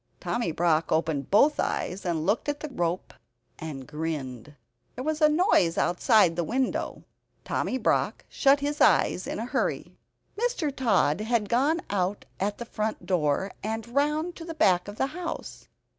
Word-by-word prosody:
Tommy 235 Hz, -8 st, -1 dB
Brock 165 Hz, -1 st, +1 dB
opened 160 Hz, -3 st, 0 dB
both 280 Hz, +9 st, +4 dB
eyes, 185 Hz, +2 st, -2 dB
and 160 Hz, -2 st, -1 dB
looked 210 Hz, -, +1 dB
at 290 Hz, 0 st, -2 dB
the 305 Hz, -, -5 dB
rope 175 Hz, -7 st, -2 dB, 0.5 s
and 145 Hz, -5 st, -6 dB
grinned. 150 Hz, -4 st, -5 dB, 0.4 s
There 255 Hz, -, -5 dB
was 310 Hz, +2 st, -2 dB
a 305 Hz, -, +7 dB
noise 300 Hz, -, +3 dB
outside 180 Hz, -1 st, +3 dB
the 175 Hz, -, 0 dB
window. 255 Hz, +8 st, -2 dB, 0.4 s
Tommy 260 Hz, -, -1 dB
Brock -, -, 0 dB
shut 280 Hz, 0 st, +3 dB
his 290 Hz, +1 st, -2 dB
eyes -, -, +3 dB
in -, -, -3 dB
a -, -, -3 dB
hurry. -, -, -2 dB, 0.4 s
Mr. 415 Hz, -, -1 dB
Tod 205 Hz, -, +2 dB
had 220 Hz, -2 st, 0 dB
gone 290 Hz, +8 st, +2 dB
out 195 Hz, 0 st, -1 dB
at 205 Hz, +2 st, -1 dB
the 235 Hz, -, -6 dB
front 215 Hz, -1 st, -3 dB
door, 175 Hz, +1 st, 0 dB
and 225 Hz, +2 st, -4 dB
round 300 Hz, +5 st, +1 dB
to 330 Hz, -, -8 dB
the 330 Hz, -1 st, -7 dB
back 185 Hz, -, +3 dB
of 205 Hz, +1 st, -8 dB
the -, -, +2 dB
house. 355 Hz, -2 st, -6 dB
210 Hz, 165 wpm, -27 LUFS, -, 0.5 s, a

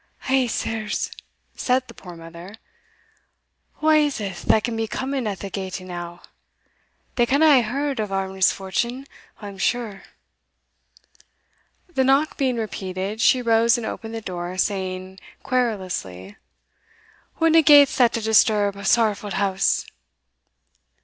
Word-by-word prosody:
"Hegh, 265 Hz, -1 st, +1 dB
sirs!" 220 Hz, -2 st, -3 dB, 0.4 s
said 255 Hz, 0 st, 0 dB
the -, -, -12 dB
poor 175 Hz, -2 st, -11 dB
mother, 170 Hz, +4 st, -11 dB, 1.3 s
"wha 310 Hz, 0 st, +3 dB
is 300 Hz, -2 st, +3 dB
that 205 Hz, +1 st, 0 dB
can 235 Hz, -, -2 dB
be 225 Hz, 0 st, -2 dB
coming 265 Hz, 0 st, -3 dB
in 205 Hz, -, -2 dB
that 195 Hz, 0 st, -7 dB
gate 190 Hz, -2 st, -5 dB
e'enow? 175 Hz, -1 st, -8 dB, 1.0 s
They 240 Hz, -1 st, +3 dB
canna 280 Hz, +5 st, +3 dB
hae -, -, +4 dB
heard 270 Hz, +4 st, -2 dB
o' 210 Hz, -, -2 dB
our 195 Hz, -1 st, -2 dB
misfortune, 195 Hz, +7 st, -1 dB, 0.4 s
I'm 200 Hz, -2 st, -9 dB
sure." 225 Hz, -3 st, -1 dB, 1.9 s
The 305 Hz, -7 st, 0 dB
knock 275 Hz, +4 st, +2 dB
being 260 Hz, -3 st, 0 dB
repeated, 200 Hz, -1 st, -4 dB
she 250 Hz, +1 st, +4 dB
rose 230 Hz, 0 st, +3 dB
and 235 Hz, -, -5 dB
opened 225 Hz, 0 st, -6 dB
the 225 Hz, -, -5 dB
door, 180 Hz, -2 st, -5 dB
saying 190 Hz, -1 st, -3 dB, 0.2 s
querulously, 185 Hz, -, -3 dB, 1.0 s
"Whatna 325 Hz, 0 st, +5 dB
gait's 290 Hz, -2 st, +7 dB
that 245 Hz, -3 st, +4 dB
to 230 Hz, -, -2 dB
disturb 215 Hz, -2 st, +3 dB
a 200 Hz, -, -8 dB
sorrowfu' 210 Hz, -2 st, +1 dB
house?" 195 Hz, -1 st, +1 dB
215 Hz, 130 wpm, -22 LUFS, 190-250 Hz, 1.9 s, gait's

